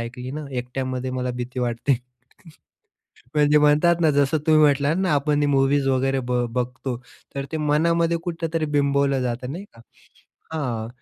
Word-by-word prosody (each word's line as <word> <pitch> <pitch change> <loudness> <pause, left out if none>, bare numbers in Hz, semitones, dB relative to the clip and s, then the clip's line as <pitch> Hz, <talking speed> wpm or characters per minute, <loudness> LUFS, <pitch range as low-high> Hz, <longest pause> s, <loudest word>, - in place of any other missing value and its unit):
ऐकली 125 +2 -6
ना, 150 +2 -6
एकट्यामध्ये 130 0 -3
मला 125 0 -2
भीती 125 +1 -4
वाटते. 120 +1 0 1.4
म्हणजे 150 0 +4
म्हणतात 150 +4 +4
ना 160 -2 +4
जसं 140 +2 +2
तुम्ही 155 -1 +5
म्हटलात 145 +1 +3
ना, 185 -4 +1
आपण 145 +1 +1
हे - - +3
मूव्हीज 135 0 +2
वगैरे 135 0 +1
बघ 125 0 0
बघतो, 125 0 -3 0.4
तर 140 - -3
ते 160 - -1
मनामध्ये 165 +3 +2
कुठेतरी 165 -2 -2
बिंबवलं 140 -1 +2
जातं, 125 +1 -3
नाही 180 +6 -6
का. 115 - -16 0.7
हां, 120 -8 -3
140 Hz, 155 wpm, -23 LUFS, 125-150 Hz, 1.4 s, तुम्ही